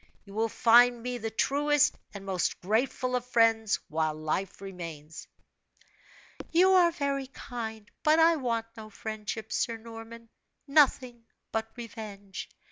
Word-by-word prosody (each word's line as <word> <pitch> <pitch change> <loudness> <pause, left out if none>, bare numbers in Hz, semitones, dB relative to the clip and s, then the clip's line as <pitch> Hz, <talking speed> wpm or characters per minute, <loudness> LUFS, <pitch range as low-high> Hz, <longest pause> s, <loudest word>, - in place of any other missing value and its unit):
You 200 - -13
will 225 +2 0
find 240 +1 +5
me 250 0 -3
the 225 0 -3
truest 290 +5 +2 0.2
and 200 -2 -9
most 190 -2 -1
grateful 250 +5 0
of 250 - -1
friends, 225 -3 +3
while 155 0 -1
life 155 +5 -3
remains." 165 -5 -8 1.2
"You 365 +3 +5
are 360 -2 +6
very 280 -4 -2
kind; 220 -4 -7
but 310 +1 +4
I 330 +1 +6
want 230 -4 -1
no 215 -1 -9
friendship, 215 0 -6
Sir 230 -1 0
Norman 230 0 -11 0.4
nothing 260 -5 +2 0.3
but 225 0 -1
revenge! 205 -4 -8
225 Hz, 130 wpm, -29 LUFS, 205-255 Hz, 1.2 s, are